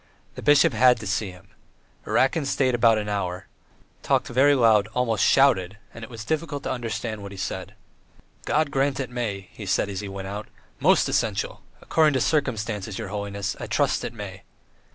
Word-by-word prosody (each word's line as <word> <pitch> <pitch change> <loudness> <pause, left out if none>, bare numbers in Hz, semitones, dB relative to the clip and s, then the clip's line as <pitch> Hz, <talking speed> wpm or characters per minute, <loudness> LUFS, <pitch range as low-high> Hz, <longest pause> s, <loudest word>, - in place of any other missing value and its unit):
The - - -8
bishop 145 -2 +5
had 125 +1 +5
to 105 - -7
see 105 0 -1
him. 90 +1 -15 0.6
Erakin 140 +2 +2
stayed 130 -2 +1
about 115 -2 +4
an 105 -1 -3
hour, 95 -3 -3 0.6
talked - - +1
very 140 +4 +4
loud, 110 -5 +4
almost 120 -3 +1
shouted, 100 -9 +3 0.2
and 115 - -10
it 115 - -8
was 115 -2 -8
difficult 150 0 -2
to - - -2
understand 115 -3 -4
what 100 0 -8
he 100 - -10
said. - - -5 0.7
"God 155 -2 +1
grant 135 0 0
it 130 -2 -4
may," 105 -6 -4
he 105 - -9
said 100 - +1
as 95 -2 -4
he 100 -1 -6
went 95 0 -6
away. 105 +2 -6 0.3
"Most - - +4
essential! - - -1 0.2
According 155 -2 +3
to 130 - +1
circumstances, 110 -9 -1
your 110 -4 -5
holiness! 100 -1 -3
I - - -5
trust - - +1
it - - -4
may!" - - -8
115 Hz, 185 wpm, -24 LUFS, 100-130 Hz, 0.7 s, bishop